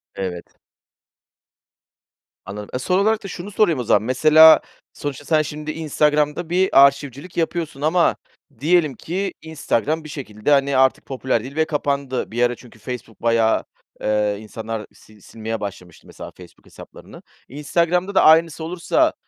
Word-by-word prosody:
Evet. 90 -3 -6 1.9
Anladım. 105 +1 -8
E, 125 - -2
son 180 +9 +1
olarak 215 +1 +1
da - - -6
şunu 190 +2 -8
sorayım 180 -8 +2
o 125 - -2
zaman, 105 -1 +2
mesela 155 +6 +6 0.3
sonuçta 145 0 -6
sen 155 0 +2
şimdi 150 +1 -5
Instagram'da 150 +1 0
bir 185 +2 +2 0.2
arşivcilik 140 +4 -3
yapıyorsun 165 -4 -2
ama 170 +3 +2 0.4
diyelim 155 -1 +2
ki 190 +3 -4
Instagram 160 -1 -2
bir 155 - -10
şekilde, 120 -4 -4
hani, 140 -1 +3
artık 130 0 +2
popüler 130 -4 -2
değil 135 +2 -9
ve 160 0 +2
kapandı. 140 -5 -2
Bir 120 +2 0
ara 120 0 +1
çünkü 120 -2 -17
Facebook 115 0 -8
bayağı, 115 -1 +2 0.4
ııı, 105 -1 0
insanlar 110 0 -6 0.2
sil 105 -1 -19
silmeye 110 +2 -6
başlamıştı 90 -5 -9
mesela - - -10
Facebook - - -17
hesaplarını. - - -14 0.3
Instagram'da 170 +7 -1
da - - +5
aynısı 160 0 +4
olursa, 180 - 0
145 Hz, 145 wpm, -21 LUFS, 115-160 Hz, 1.9 s, mesela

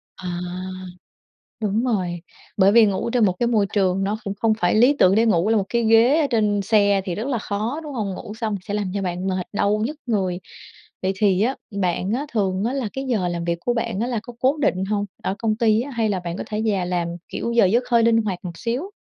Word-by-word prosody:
À, 175 -1 -5 1.2
đúng 215 +2 0
rồi, 180 -7 -1 0.4
bởi 195 0 +5
vì 230 0 +7
ngủ 200 +3 -1
trên 235 -2 +3
một 185 - +2
cái 240 - +2
môi 220 -4 +2
trường 195 -1 +1
nó 210 +2 -1
cũng 200 - -3
không 220 +1 +2
phải 175 0 +2
lý 245 +6 +5
tưởng 185 +1 +5
để 225 +2 +4
ngủ 200 -2 +2
là 225 - +3
một 200 - 0
cái 235 -1 +1
ghế 230 +7 +5
ở 290 - +1
trên 210 -4 +1
xe 200 -1 +3
thì 180 - -3
rất 220 +7 -4
là 260 -4 0
khó, 215 +7 -3
đúng 295 -2 -7
hông? 210 -6 -2
Ngủ 210 +1 -8
xong 220 -1 -2
sẽ 205 - -3
làm 205 -3 -2
cho 200 - -1
bạn 180 0 -3
mệt, 185 -1 -1
đau 205 +1 +1
nhức 300 +4 -4
người. 190 -7 -1 0.6
Vậy 190 - +1
thì 195 -2 +3
á, 255 +5 +1 0.3
bạn 185 +3 0
á 275 +4 -1
thường 195 -3 0
á 245 - -1
là 265 -6 -2
cái 270 0 -4
giờ 210 -8 0
làm 170 -1 -3
việc 170 0 0
của 245 - +2
bạn 230 -4 -2
á 235 - 0
là 240 -3 -1
có 245 - -10
cố 265 +5 +2
định 190 -7 +1
hông, 205 0 -1 0.2
ở 190 - -1
công 220 -2 0
ty 220 0 +3
á, 280 +2 -6
hay 225 -3 0
là 190 - 0
bạn 175 0 -5
có - - -4
thể 215 0 -2
về 195 -4 +1
làm, 175 -1 -1 0.2
kiểu, 235 - -3
giờ 235 -3 +5
giấc 230 +7 +2
hơi 235 -1 +4
linh 230 0 +4
hoạt 195 -3 -4
một 170 -1 -6
xíu? 255 - -3
210 Hz, 255 wpm, -22 LUFS, 190-235 Hz, 1.2 s, vì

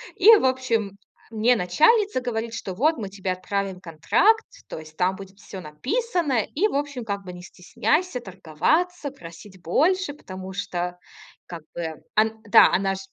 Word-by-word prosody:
И, 440 +4 +8
в - - 0
общем, 240 -6 0
э, 200 +3 -20
мне 240 +3 +4
начальница 315 - +3
говорит, 230 -2 -3
что: 190 -4 -5
"Вот 305 - +2
мы 200 -3 -5
тебе 190 -1 -4
отправим 190 0 -3
контракт. 200 - +2 0.2
То - - -6
есть 155 0 -13
там 185 +1 +1
будет 195 0 -12
всё 195 -2 -9
написано. 275 - -1
И, 395 +9 +3
в - - -5
общем, 280 -4 -3
как 200 -2 -4
бы 180 - -7
не 180 - -10
стесняйся 295 - -1
торговаться, 280 - -1
просить 185 -4 -13
больше, 325 - +1
потому 190 -8 -9
что 180 -2 -4 0.5
как 170 -3 -9
бы" 160 -2 -5
ан 220 +1 +1
да, 205 - +7
она 195 +1 +1
ж - - -7
205 Hz, 170 wpm, -24 LUFS, 185-285 Hz, 0.5 s, И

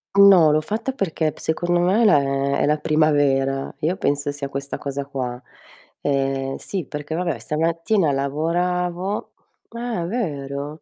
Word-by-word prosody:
No, 190 -6 +7
l'ho 155 - +3
fatta 220 +10 -3
perché 160 - -1
p - - -20
secondo 175 +2 0
me 185 +6 +3
è - - +4
la 205 - +6
è 140 0 0
è - - +3
la 150 +1 +2
primavera. 145 -3 +2
Io 170 +5 +1
penso 145 -4 0
sia 140 -1 -5
questa 140 0 -5
cosa 140 0 -4
qua. 125 -3 -4 0.6
Ehm, 135 -1 -1
sì 190 -6 -4
perché 150 +1 -5
vabbè, 170 -5 -1
stamattina 165 - 0
lavoravo 175 +7 -1 0.4
eh, 235 -7 -3
vero? 145 - -4
155 Hz, 150 wpm, -22 LUFS, 140-180 Hz, 0.6 s, No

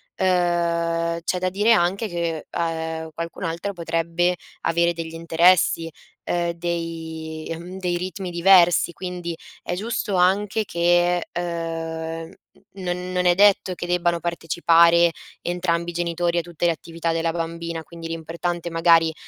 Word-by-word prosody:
Ehm, 170 -2 +1
c'è 180 - 0
da 185 0 0
dire 205 +5 +2
anche 195 +2 +2
che, 170 -3 -3
ehm, 160 -1 -3
qualcun 170 +4 -6
altro 170 +4 -2
potrebbe 170 0 0 0.3
avere 170 +1 +2
degli 165 -1 -6
interessi, 165 0 +3 0.3
ehm, 175 -1 0
dei 165 -2 -5
mhmm, 180 +3 -8
dei 180 -2 -1
ritmi 185 +1 -5
diversi, 175 0 +5
quindi 180 -2 -5 0.3
è 175 - -3
giusto 210 0 -2
anche 200 +4 +2
che, 175 0 +2
ehm, 165 -1 -4
mhmm, 170 - -16 0.5
non 180 0 -3
non 180 0 0
è 175 -1 +5
detto 195 -1 +4
che 175 - -5
debbano 175 -1 +1
partecipare 170 0 +4 0.3
entrambi 175 -1 -1
i - - -14
genitori 170 0 -1
a - - +3
tutte 175 0 -4
le 170 - +4
attività 165 0 -3
della 165 0 0
bambina, 165 0 -4
quindi 165 0 -9
l'importante, 170 +1 -3
magari, 165 -1 +4
170 Hz, 140 wpm, -23 LUFS, 165-180 Hz, 0.5 s, diversi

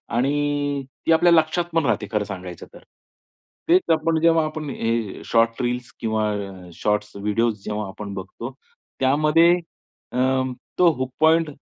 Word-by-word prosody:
आणि 145 +1 0 0.2
ती - - +3
आपल्या 170 +2 +5
लक्षातपण 165 0 +2
राहते 105 -4 0
खरं 105 -2 +1
सांगायचं 90 -3 -8
तर. - - -12 0.9
तेच 180 +2 +6
आपण 160 0 +1
जेव्हा 165 -1 +4
आपण 155 -1 -5
हे 115 -5 -2
शॉर्ट 115 0 +2
रील्स 120 0 -2
किंवा 110 -1 0
अ, 95 -3 -6
शॉर्ट्स 105 +2 -1
व्हिडिओस 105 +1 -1
जेव्हा 105 -1 -3
आपण 100 +1 -7
बघतो, 100 +6 -7 0.5
त्यामध्ये 150 +5 +4 0.6
अ, - - -4 0.6
तो 175 -2 +6
हुक 130 0 -3
पॉईंट 160 0 +4
125 Hz, 140 wpm, -23 LUFS, 105-155 Hz, 0.9 s, तेच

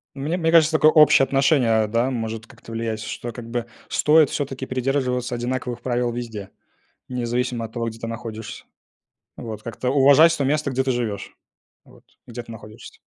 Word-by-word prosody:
Мне 145 +5 -2
мне 165 -2 +1
кажется 160 -1 +5
такое 155 0 +5
общее 150 -3 +6
отношение, 135 -6 +2
да. 115 +4 0
Может 115 -2 -4
как-то 115 - -14
влиять, 115 -1 -3
что, 120 +1 -6
как 115 0 -9
бы 120 -1 -2 0.2
стоит 155 -1 +4
всё-таки 135 -2 -4
придерживаться 125 -1 -1
одинаковых 125 0 -3
правил 120 -1 -1
везде. 115 -5 -6 0.6
Независимо 125 -1 -2
от 110 - -12
того, 115 -1 -2
где 115 0 -7
ты 115 - -5
находишься. 115 -1 -7 0.7
Вот, 110 -2 -7
как-то 125 +1 -3
уважать 140 +5 +6
то 140 - 0
место, 145 +1 0
где 130 +1 0
ты 130 - 0
живёшь, 115 -5 -3 0.5
вот, - - -20 0.2
где 120 0 -7
ты 115 - -12
находишься. 110 -1 -12
125 Hz, 170 wpm, -22 LUFS, 115-135 Hz, 0.7 s, общее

